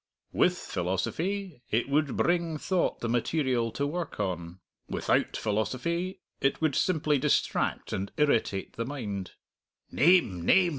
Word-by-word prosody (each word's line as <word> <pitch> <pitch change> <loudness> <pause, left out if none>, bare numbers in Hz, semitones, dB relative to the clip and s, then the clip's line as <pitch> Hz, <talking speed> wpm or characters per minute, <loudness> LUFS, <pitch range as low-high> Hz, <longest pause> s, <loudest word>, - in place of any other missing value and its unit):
With 180 0 +3
philosophy 160 - -2
it 115 +2 +1
would 140 -1 +1
bring 170 -2 +1
thought 180 +3 0
the 115 - -1
material 120 -1 +1
to 140 - -1
work 165 -1 -4
on. 90 -3 -3 0.3
Without - - +1
philosophy 130 - -1 0.2
it 135 - +1
would 155 -3 +1
simply 155 -5 +2
distract - - 0
and 95 +1 -3
irritate 115 -9 +1
the 115 - -1
mind." 105 -9 -5 0.6
"Name, 145 - +4
name!" 180 - +5
140 Hz, 130 wpm, -29 LUFS, 105-170 Hz, 0.6 s, name